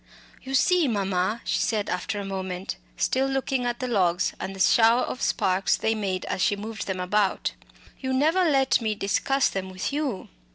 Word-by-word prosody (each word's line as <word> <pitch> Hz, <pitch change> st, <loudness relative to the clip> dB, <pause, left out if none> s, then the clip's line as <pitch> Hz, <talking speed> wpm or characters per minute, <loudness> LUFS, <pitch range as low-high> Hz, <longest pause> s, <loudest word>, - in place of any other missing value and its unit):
"You 270 Hz, +1 st, -4 dB
see, 355 Hz, +2 st, +4 dB
mamma," 195 Hz, 0 st, 0 dB
she -, -, 0 dB
said 215 Hz, -3 st, 0 dB
after 205 Hz, +4 st, -2 dB
a 200 Hz, -, -5 dB
moment, 190 Hz, -1 st, -4 dB, 0.2 s
still 265 Hz, -, +1 dB
looking 270 Hz, -2 st, -1 dB
at 240 Hz, 0 st, -2 dB
the 255 Hz, -, -2 dB
logs 180 Hz, -7 st, +1 dB
and 195 Hz, -, -5 dB
the -, -, -10 dB
shower 230 Hz, +5 st, +5 dB
of 255 Hz, -, -5 dB
sparks 190 Hz, +1 st, +1 dB
they 220 Hz, -, +1 dB
made 195 Hz, -4 st, -2 dB
as -, -, -3 dB
she 205 Hz, -, +3 dB
moved 215 Hz, +2 st, -6 dB
them 190 Hz, -1 st, -2 dB
about, 195 Hz, +2 st, +1 dB, 0.5 s
"you 260 Hz, -1 st, -3 dB
never 315 Hz, +8 st, +3 dB
let 270 Hz, -6 st, +3 dB
me 215 Hz, -2 st, -1 dB
discuss 235 Hz, +7 st, +1 dB
them 190 Hz, -1 st, -4 dB
with 185 Hz, +8 st, -4 dB
you." 285 Hz, -9 st, -2 dB
215 Hz, 190 wpm, -25 LUFS, 190-260 Hz, 0.5 s, shower